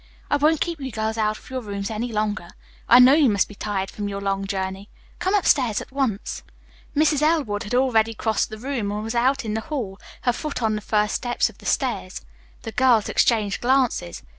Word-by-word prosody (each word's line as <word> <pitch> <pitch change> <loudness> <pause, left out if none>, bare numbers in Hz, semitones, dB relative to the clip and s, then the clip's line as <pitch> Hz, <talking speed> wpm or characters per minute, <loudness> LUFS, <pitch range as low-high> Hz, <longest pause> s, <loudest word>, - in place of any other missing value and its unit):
"I 290 - +4
won't 305 +2 +2
keep 335 -4 -2
you 265 -1 -4
girls 220 +1 -2
out 215 0 +1
of - - -16
your 260 -1 -3
rooms 200 -1 -4
any 230 +3 -3
longer. 210 -4 -2 0.4
I 240 - +9
know 250 +2 +8
you 295 -4 +5
must 200 -2 +2
be - - -11
tired 195 -1 -3
from 205 -1 -4
your 200 0 -4
long 195 0 -2
journey. 190 0 -4 0.3
Come 375 +3 +1
upstairs 260 - +3
at - - -10
once." 260 -7 -2 0.5
Mrs. 300 -1 +3
Elwood 300 -10 +1
had 230 +2 -3
already 225 -4 +2
crossed 220 0 0
the 215 - -7
room 235 -4 -3
and 210 +1 -3
was 225 +1 -4
out 260 +2 +1
in 215 - -2
the 220 - -1
hall, 225 -9 -5 0.2
her 245 - +2
foot 285 -1 -4
on 220 -1 +2
the 210 - -3
first 210 0 +1
step 245 -1 0
of - - -18
the - - -8
stairs. - - -1 0.4
The 225 - -5
girls 245 -3 +3
exchanged 215 -4 +2
glances. 250 - +1
225 Hz, 215 wpm, -23 LUFS, 205-265 Hz, 0.5 s, I